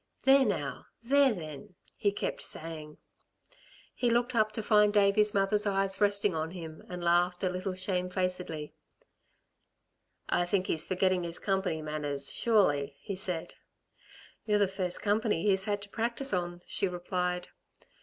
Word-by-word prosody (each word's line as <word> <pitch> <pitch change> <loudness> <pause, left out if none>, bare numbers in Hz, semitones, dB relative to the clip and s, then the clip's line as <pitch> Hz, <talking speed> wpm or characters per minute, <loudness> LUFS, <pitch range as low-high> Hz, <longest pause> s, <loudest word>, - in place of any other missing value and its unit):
"There 270 0 +6
now! 150 - -3 0.2
There 275 +2 +4
then!" 155 -4 -8 0.2
he 205 - +1
kept 205 - -3
saying. 155 -2 -3 1.0
He 245 - 0
looked 240 +2 +1
up 215 -2 +2
to 220 - -3
find 210 -1 +4
Davey's 205 0 +3
mother's 205 +2 +2
eyes 195 0 0
resting 200 -1 +3
on 160 0 -2
him 165 -3 -8
and 180 -1 -6
laughed 175 +1 +2
a 185 - +2
little 185 +1 -3
shamefacedly. 180 -4 -2 1.5
"I 175 - +1
think 190 0 +1
he's 160 - +1
forgetting 185 -1 +1
his 170 0 -1
company 190 -5 -1
manners, 145 -2 -2
surely," 145 -11 +2
he 200 - -6
said. 180 -4 -3 0.9
"You're 210 -1 +3
the 205 -1 +3
first 185 -2 -2
company 210 -4 +1
he's 195 -2 +3
had 205 -1 -2
to 200 - -10
practise 235 +5 -1
on," 175 -1 -2
she 195 - 0
replied. 180 0 -2
185 Hz, 145 wpm, -30 LUFS, 175-205 Hz, 1.5 s, There